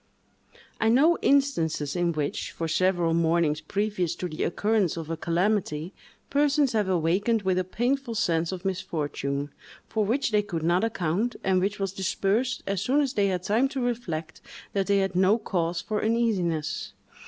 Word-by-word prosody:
I 225 - +3
know 300 +9 +4
instances 165 - +1
in 175 -1 +1
which, 150 -2 -2
for 165 - -3
several 175 0 +2
mornings 165 -2 +2
previous 195 0 -1
to 180 - -4
the 155 -3 -6
occurrence 205 -1 +1
of 165 -1 -5
a - - -1
calamity, 170 -1 -1 0.4
persons 285 -2 +2
have 210 -3 +1
awakened 190 +6 +1
with 185 -1 +1
a - - +1
painful 240 +5 -1
sense 165 -5 +1
of 185 0 -6
misfortune, 150 -6 -2 0.4
for 220 - 0
which 235 +4 0
they 210 -1 +3
could 170 -6 -4
not 175 +4 +2
account, 210 +2 -1
and 190 -1 +2
which 205 +2 -1
was 195 -1 -2
dispersed 200 +6 0
as 195 -2 -1
soon 260 +7 +2
as 280 -3 0
they 200 -4 +2
had 180 -2 -1
time 225 +8 +2
to 270 0 -5
reflect 210 -11 -3 0.3
that 195 -1 0
they 200 0 +3
had 195 -2 0
no 190 +4 +4
cause 175 -5 -2
for 215 -2 -2
uneasiness. 195 -9 0
190 Hz, 170 wpm, -26 LUFS, 170-225 Hz, 0.4 s, know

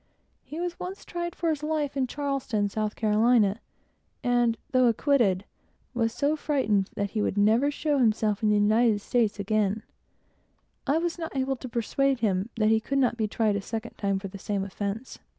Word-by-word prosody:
He 310 - -7
was 350 0 -3
once 375 +2 -6
tried 345 0 -4
for 335 -2 0
his 300 -2 -3
life 300 -2 -1
in 265 -2 0
Charleston, 260 -7 -1
South 215 +1 -2
Carolina, 215 -1 +3 0.6
and 240 -2 +2
though 255 -2 +4
acquitted, 230 -6 +2
yet - - -22 0.5
he 240 - -5
was 225 0 +2
so 285 +6 0
frightened 220 -11 0
that 200 -1 -2
he 215 - -1
never 215 +7 +3
would 290 - -1
show 295 -2 0
himself 215 -3 +2
in 215 - +2
the 210 - +4
United 215 +1 +3
States 220 -2 0
again; 210 +1 0 1.0
and 320 +5 +2
I - - +3
could 345 - -6 0.3
not 260 -2 -4
persuade 260 +3 0
him 195 -1 0
that 215 -2 +2
he 220 - +4
could 275 +5 -2
never 250 -3 +2
be 220 -2 -1
tried 215 0 +1
a - - -3
second 225 +3 -5
time 200 -1 0
for 195 +1 -5
the 195 +1 -10
same 200 0 -2
offence. 200 +5 -5
230 Hz, 190 wpm, -27 LUFS, 210-275 Hz, 1.0 s, though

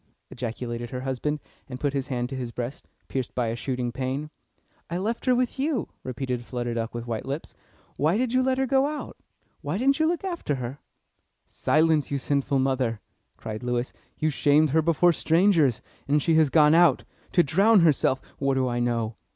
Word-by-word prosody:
ejaculated 120 0 -5
her 125 +1 -5
husband, 135 +3 -2 0.3
and 125 0 -6
put 145 0 -1
his 135 -2 -2
hand 125 -2 -2
to 135 - -6
his 125 -2 -4
breast, 125 +3 -6 0.2
pierced 130 -2 -4
by 120 -2 0
a 115 - -2
shooting 125 -1 -3
pain. 135 +4 -3 0.6
"I 170 - -2
left 225 +7 -3
her 250 - +5
with 250 +1 -1
you," 275 - -1
repeated 125 -1 -3
Flutter 120 -1 -3
Duck 115 0 -3
with 120 0 -4
white 115 +1 -4
lips. 140 +4 -4 0.4
"Why 160 +7 +2
did 250 0 0
you 255 - +4
let 260 0 +1
her 265 - +1
go 270 +1 +3
out? 300 0 -5 0.5
Why 150 +4 -2
didn't 275 +5 +2
you 315 - +3
look 345 +2 -1
after 345 - -2
her?" 130 +2 -6 0.7
"Silence, 155 -1 +2
you 140 - -1
sinful 140 0 0
mother!" 130 -4 0 0.4
cried 110 -1 -6
Lewis. 125 0 -2 0.2
"You 155 0 +1
shamed 145 +1 +3
her 160 +2 +4
before 170 +2 +3
strangers, 165 - +3 0.2
and 145 +2 +3
she 165 +3 +1
has 160 -2 +4
gone 150 +1 +5
out 170 -5 +5 0.3
to 175 - +5
drown 195 +8 +4
herself 145 -4 +3 0.2
what 135 -1 +1
do 130 -1 +1
I 120 -1 -1
know?" 115 -2 -1
140 Hz, 190 wpm, -26 LUFS, 125-170 Hz, 0.7 s, her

